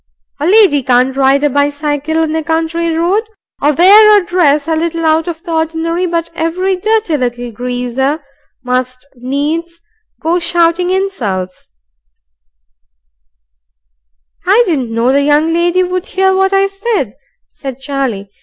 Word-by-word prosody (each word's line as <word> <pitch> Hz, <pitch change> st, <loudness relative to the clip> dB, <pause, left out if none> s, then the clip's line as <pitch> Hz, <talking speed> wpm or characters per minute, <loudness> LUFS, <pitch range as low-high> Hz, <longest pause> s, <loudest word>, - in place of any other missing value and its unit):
"A 295 Hz, -, -1 dB
lady 380 Hz, -8 st, +4 dB
can't 255 Hz, +1 st, +1 dB
ride 275 Hz, +1 st, +2 dB
a 295 Hz, -, +3 dB
bicycle 290 Hz, +2 st, -1 dB
in 315 Hz, 0 st, -2 dB
a 320 Hz, -, -1 dB
country 330 Hz, +1 st, -1 dB
road, 340 Hz, +6 st, +1 dB, 0.4 s
or 295 Hz, -, +3 dB
wear 415 Hz, +6 st, +7 dB
a 370 Hz, -, -6 dB
dress 305 Hz, -5 st, +1 dB
a 325 Hz, -, 0 dB
little 330 Hz, 0 st, -2 dB
out 320 Hz, +2 st, +2 dB
of 335 Hz, -1 st, -6 dB
the 345 Hz, -, -7 dB
ordinary, 325 Hz, +2 st, -1 dB
but 335 Hz, -1 st, -3 dB
every 350 Hz, +4 st, -1 dB
dirty 425 Hz, -4 st, 0 dB
little 245 Hz, -2 st, -3 dB
greaser 250 Hz, +4 st, -2 dB, 0.4 s
must 255 Hz, 0 st, -3 dB
needs 295 Hz, +7 st, -3 dB, 0.4 s
go 335 Hz, +3 st, 0 dB
shouting 340 Hz, +1 st, +1 dB
insults 225 Hz, -, -3 dB, 1.8 s
" -, -, -38 dB
"I 425 Hz, +6 st, +5 dB
didn't 275 Hz, -, -1 dB
know 230 Hz, +3 st, +1 dB
the 280 Hz, +1 st, +2 dB
young 295 Hz, +3 st, +2 dB
lady 350 Hz, +2 st, +2 dB
would 365 Hz, +1 st, -3 dB
hear 380 Hz, 0 st, +1 dB
what 385 Hz, 0 st, +1 dB
I 390 Hz, 0 st, +3 dB
said," 390 Hz, -, -2 dB, 0.4 s
said 270 Hz, -3 st, -7 dB
Charlie. 265 Hz, -8 st, -3 dB
320 Hz, 145 wpm, -13 LUFS, 260-350 Hz, 1.8 s, wear